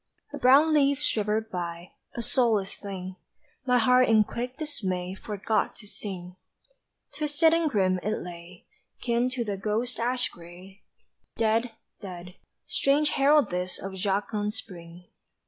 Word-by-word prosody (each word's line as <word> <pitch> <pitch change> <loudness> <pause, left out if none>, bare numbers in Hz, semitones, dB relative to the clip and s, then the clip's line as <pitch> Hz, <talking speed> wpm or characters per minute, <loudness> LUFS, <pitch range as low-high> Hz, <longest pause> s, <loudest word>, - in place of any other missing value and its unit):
A - - -4
brown 285 +5 +6
leaf 280 -2 +4
shivered 220 -4 0
by, 170 -1 -5 0.2
A 235 - -2
soulless 220 -5 +2
thing 190 -2 -7 0.5
My 250 0 +4
heart 250 +1 +4
in 220 -1 +6
quick 245 +4 -5
dismay 190 - -3
Forgot 210 +2 -2
to - - -9
sing 185 -3 -7 0.8
Twisted 300 +2 +3
and 330 -1 +2
grim 185 -6 +2
it 215 +3 -1
lay, 175 0 -10 0.4
Kin 240 +1 +1
to 255 -2 -2
the 200 -2 -3
ghost 220 +5 -2
ash 250 +2 0
gray, 180 +4 -14 0.6
Dead, 225 +1 +1 0.3
dead 180 -2 -8 0.3
strange 290 +2 +2
herald 280 -4 +4
this 180 +1 -2
Of 195 0 -7
jocund 205 +2 -1
Spring! 170 -1 -9
210 Hz, 135 wpm, -27 LUFS, 185-250 Hz, 0.8 s, brown